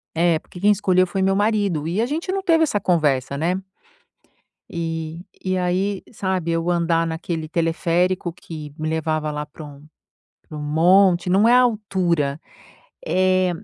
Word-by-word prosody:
é 165 -1 +2
porque 180 - -13
quem 210 +1 +5
escolheu 185 -2 +3
foi 190 +2 -2
meu 195 0 +2
marido 205 -7 0
e 190 +6 0
a - - +2
gente 320 +7 -3
não 390 0 -1
teve 325 -3 +4
essa 210 -9 0
conversa, 140 -7 +1
né? 180 +5 -1 1.1
E 165 -1 -4 0.2
e, 185 0 0
aí, 185 +2 -1
sabe, 185 -4 -2
eu 165 +1 -1
andar 165 -1 +1
naquele 160 0 -4
teleférico 175 +2 0
que 155 -4 -9
me 155 0 -3
levava 155 -1 -1
lá 150 0 -3
para 150 +1 -11
um 145 +1 -13 0.6
para 155 - -8
um - - -5
monte 180 +4 +3
não 205 +5 +4
é 245 - +6
a 250 - +7
altura, 185 - 0 0.7
é 185 0 +2
175 Hz, 165 wpm, -21 LUFS, 160-190 Hz, 1.1 s, a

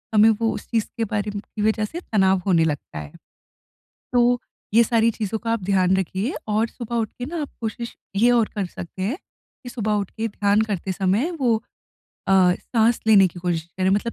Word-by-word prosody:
हमें 215 +1 +7
वो 225 +1 +1
उस - - -7
चीज़ 225 -3 +1
के 230 - 0
बारे 210 -1 -2
म - - -2
की 210 +1 -8
इस 210 - +3
वज़ह 215 -1 +1
से 330 +11 -6
तनाव 190 -3 +3
होने 175 -4 +4
लगता 145 - -3
है, 75 -1 -8 1.0
तो 245 0 +3 0.3
ये 230 +2 +7
सारी 230 0 +3
चीज़ों 220 -1 -3
का 230 0 -2
आप 230 -4 -1
ध्यान 190 -1 +3
रखिए। 190 - -2
और 215 +2 +1
सुबह 235 0 -6
उठ 225 -2 0
के 245 - -6
ना, 325 +3 -4
आप 290 - -4
कोशिश 230 +1 -4 0.2
ये 235 +5 +4
और 235 -3 +3
कर 205 -2 -1
सकते 180 +1 -8
हैं 220 - -1 0.5
कि 245 - -7
सुबह 215 -3 -2
उठ 205 -2 -1
के 225 +1 -3
ध्यान 205 0 +2
करते 200 -4 -2
समय 195 - +1
वो 240 -3 +3 0.7
अ, - - +1 0.2
साँस 230 +3 +1
लेने 205 -3 +7
की 175 - -11
कोशिश 170 -2 -1
करें, 185 0 +2
मतलब 210 +4 0
215 Hz, 210 wpm, -23 LUFS, 190-230 Hz, 1.0 s, हमें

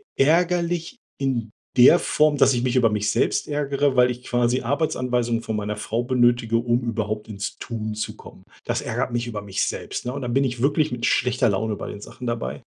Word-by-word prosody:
ärgerlich 170 - +1 0.2
in 125 -5 -2 0.2
der 130 +8 +7
Form, 150 -1 +2
dass - - +5
ich 120 -1 -1
mich 130 0 +1
über 120 -2 +4
mich 105 -1 0
selbst 105 - 0
ärgere, 140 -2 0
weil 125 0 +5
ich 125 0 -8
quasi 120 +1 +1
Arbeitsanweisungen 125 -4 0
von 110 -2 -3
meiner 105 0 -3
Frau 115 +2 -2
benötige, 120 -2 +2
um 120 +1 +2
überhaupt 110 -2 -3
ins 100 -2 -5
Tun 110 -3 -5
zu 110 - -4
kommen. - - -14 0.2
Das - - -2
ärgert - - -2
mich 120 0 -2
über 110 -3 -5
mich 100 -1 -1
selbst, - - -5
ne? 125 - -3
Und 140 - -5
dann 120 -2 -3
bin 135 +2 +3
ich 125 -2 -3
wirklich 150 +1 +2
mit 120 -1 -2
schlechter 125 -1 +2
Laune 105 +2 -1
bei - - -6
den 105 - -7
Sachen 125 +4 -9
dabei. 75 - -3
120 Hz, 205 wpm, -23 LUFS, 110-135 Hz, 0.2 s, der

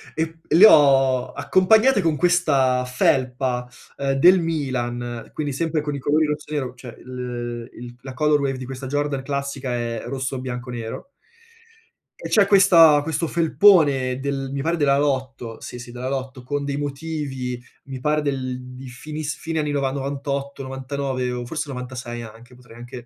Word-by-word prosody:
e 160 +1 0
p - - -28 0.2
le 195 - +9
ho 135 -6 +5
accompagnate 220 +5 +4
con 165 -3 +1
questa 140 -7 +2
felpa, 125 -1 0 0.3
uhm, 140 -1 -1
del 180 +7 +6
Milan, 120 -7 -3
quindi 150 -2 -3
sempre 160 +2 -1
con 145 -1 -3
i - - -5
colori 150 +4 +2
rosso 150 0 -4
e - - -4
nero, 130 -4 -2
cioè 120 -2 -10
l 120 -2 -6
il 120 0 -10
la 130 -1 -8
color 150 +3 +2
wave 135 -2 -1
di 130 - -7
questa 135 +1 -7
Jordan 145 0 -1
classica 140 -2 -3
è 115 -2 -3
rosso, 130 -1 -3
bianco, 125 0 -6
nero 115 - -6 1.1
e - - -5
c'è 205 -3 +4
questa 170 -7 +6
questo 160 +2 -2
felpone 155 -7 +4
del 135 -1 -3
mi 140 0 -3
pare 165 +4 0
della 140 -3 +2
Lotto, 130 -5 -2
sì, 125 - -8
sì 120 0 -10
della 125 +1 -4
Lotto, 130 -1 -5
con 145 +2 -3
dei 140 -1 -2
motivi, 140 -4 -4 0.2
mi 135 -2 -7
pare 150 +2 +1
del 130 -3 -3
di 130 +1 -9
finiss 150 +3 -6
fine 160 -1 -3
anni 150 -1 -1
nova 140 -2 0
98, 140 0 -4
99 135 -1 -3
o 120 0 -4
forse 155 +2 -4
96 125 -2 -6
anche, 115 +3 -13
potrei 125 -2 -16
anche 120 +1 -10
135 Hz, 170 wpm, -22 LUFS, 125-150 Hz, 1.1 s, le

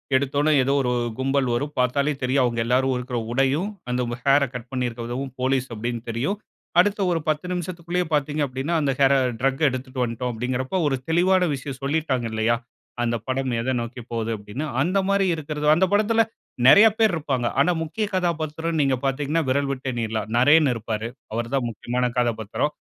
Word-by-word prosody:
எடுத்தோன 140 +3 +2
ஏதோ 135 +2 +1
ஒரு 125 -1 0 0.3
கும்பல் 135 0 +1
வரும் 145 +5 -3
பாத்தாலே 140 +4 +2
தெரியும். 130 +1 +2
அவுங்க 120 -1 0
எல்லாரும் 130 +2 +2
இருக்கிற 125 0 -4
உடையும் 135 - +1 0.2
அந்த 125 0 0 0.2
ஹேர்ற 140 +1 +5
கட் 125 0 -7
பண்ணியிருக்கிறதவும் 125 +1 -3
போலீஸ் 130 0 +1
அப்டின்னு 115 +1 -3
தெரியும். 130 - -1 0.4
அடுத்த 205 +3 +3
ஒரு 170 - +1
10 155 +3 0
நிமிஷத்திக்குள்ளேயே 175 0 -2
பாத்தீங்க 150 +1 0
அப்டின்னா, 135 +5 -3
"அந்த 140 -2 +1
ஹேர 140 0 +5 0.3
டிரக் 135 +3 0
எடுத்துக்கிட்டு 130 0 -3
வந்துட்டோம்." 120 +1 -3
அப்டின்கிறப்போ 130 +7 -2
ஒரு 140 - +1
தெளிவான 180 +2 +3
விஷயம் 135 -1 -6
சொல்லிட்டாங்க 140 -4 0
இல்லயா? 110 +1 +1 0.5
அந்த 120 0 0
படம் 130 0 -1
எத 130 +3 -1
நோக்கிபோகுது 115 -1 -4
அப்டின்னு. 105 +8 -6 0.2
அந்த 185 +7 +2
மாதிரி 200 0 +3
இருக்குறது. 150 -1 -4
அந்த 185 +4 +3
படத்தில 220 +2 +4 0.4
நெறைய 200 +10 +9
பேர் 220 -4 +4
இருப்பாங்க. 135 -6 -1
ஆனா, 155 +6 +4
முக்கிய 190 +7 -2
கதாபாத்திரம்ன்னு 160 -2 -1
நீங்க 135 -1 +2
பாத்தீங்கன்னா 145 +4 0
விரல் 140 +1 +1
விட்டு 135 -1 -4
எண்ணிறலாம். 110 -2 -3
நரேன் 145 +4 +5
இருப்பாரு 110 0 -4 0.2
அவர் 115 +1 -3
தான் 130 -3 0
முக்கியமான 125 +3 -2
கதாபாத்திரம். 115 +4 -1
135 Hz, 165 wpm, -23 LUFS, 125-155 Hz, 0.5 s, நெறைய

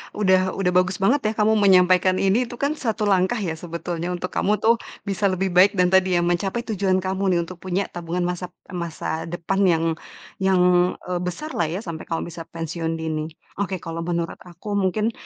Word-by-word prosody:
udah 190 -2 +2
udah 180 -2 +1
bagus 185 +1 +2
banget 195 +10 +2
ya 215 - 0
kamu 215 0 +3
menyampaikan 185 -1 +5
ini, 200 +6 +2
itu 240 - -8
kan 280 +4 0
satu 230 -7 -2
langkah 195 +2 +2
ya 195 -7 -2
sebetulnya 170 +1 -5
untuk 180 +1 -5
kamu 210 - +1
tuh 230 +1 +4 0.2
bisa 200 0 0
lebih 190 0 0
baik 185 +3 +5
dan 180 -1 +3
tadi 190 -1 +4
ya 175 - +2
mencapai 190 +6 0
tujuan 190 -4 0
kamu 190 -1 0
nih - - +2
untuk 175 +1 -10
punya 185 +2 -1
tabungan 175 +1 -3
masap 180 0 -4 0.2
masa 165 -2 -4
depan 175 +3 -2
yang 165 -2 +3 0.6
yang, 180 -1 +3 0.2
eee, 180 - 0
besarlah 180 - -2
ya 180 +8 -4
sampai 165 -3 -7
kamu 165 +1 -3
bisa 165 0 -8
pensiun 165 0 -3
dini. 160 -1 -3 0.3
Oke, 195 -1 -1
kalau 165 0 -5
menurut 170 0 -2
aku 180 +4 -9
mungkin 210 +4 +1
185 Hz, 190 wpm, -23 LUFS, 170-195 Hz, 0.6 s, menyampaikan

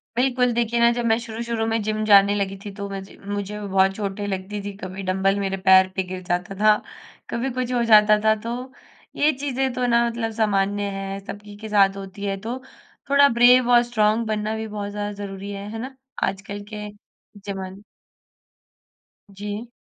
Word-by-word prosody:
बिल्कुल 250 0 +2
देखिए 235 0 0
ना 235 0 +5
जब 240 0 -2
मैं 225 -1 +3
शुरू-शुरू 230 0 -3
में 225 0 0
जिम 215 +1 -1
जाने 200 -1 +6
लगी 195 -1 -2
थी 205 - -6
तो 200 -1 -5
मझे 195 0 -8
मुझे 205 +1 -4
बहुत 195 -1 +2
चोटें 205 0 -3
लगती 195 +1 -4
थी। 205 - -4
कभी 190 0 -7
डंबल 190 +1 +1
मेरे 195 -1 -1
पैर 190 0 +6
पे 190 - 0
गिर 185 0 -6
जाता 180 +3 -2
था, 215 0 +6 0.5
कभी 245 +3 -2
कुछ 255 0 -2
हो 240 -1 +2
जाता 215 -2 +6
था। 220 - +6
तो 245 +3 -5 0.4
ये 300 +1 +3
चीज़ें 270 -1 -1
तो 250 0 -1
ना 235 -1 +3
मतलब 230 -1 -3
सामान्य 205 -2 +1
हैं 195 0 -4
सबकी 205 0 -9
के 220 +1 -8
साथ 200 -2 +4
होती 195 +1 -7
हैं। 195 -1 -2
तो 235 +4 -4 0.5
थोड़ा 280 0 +6
ब्रेव 245 +1 +6
और 240 0 +6
स्ट्रॉन्ग 220 -1 +1
बनना 215 0 -1
भी 220 0 -4
बहुत 205 -1 -5
ज़्यादा 205 0 -3
ज़रूरी 195 0 -6
है। 200 +1 -6
है 225 - -5
ना? 260 +2 -7 0.3
आजकल 195 +1 -3
के 210 0 -5 0.6
ज़माने 190 0 -6 1.5
जी। 205 +3 -6
210 Hz, 185 wpm, -23 LUFS, 195-235 Hz, 1.5 s, जाने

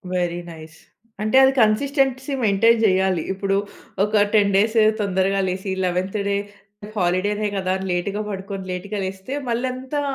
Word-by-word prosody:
Very 175 -1 -1
nice. 160 0 -12 0.4
అంటే, 215 +5 +2
అది 265 - +6
consistency 270 +4 +1
maintain 225 +3 +4
చేయాలి. 190 -4 +2
ఇప్పుడు 195 0 -1 0.5
ఒక 210 0 +2
10 200 -2 +4
డేస్ 215 +3 +2 0.2
తొందరగా 195 0 +1
లేసి, 190 +1 -3
11త్ 185 +3 -1
డే 200 - +1 0.6
హాలిడేనే 200 +3 0
కదా! 185 -1 0 0.2
లేట్‌గా 190 +4 -1
పడుకొని 195 -1 -6
లేట్‌గా 200 +3 -4
లేస్తే, 190 +6 -6 0.2
మళ్ళీ 235 +2 0
అంతా 260 +3 -4
200 Hz, 135 wpm, -22 LUFS, 185-220 Hz, 0.6 s, అది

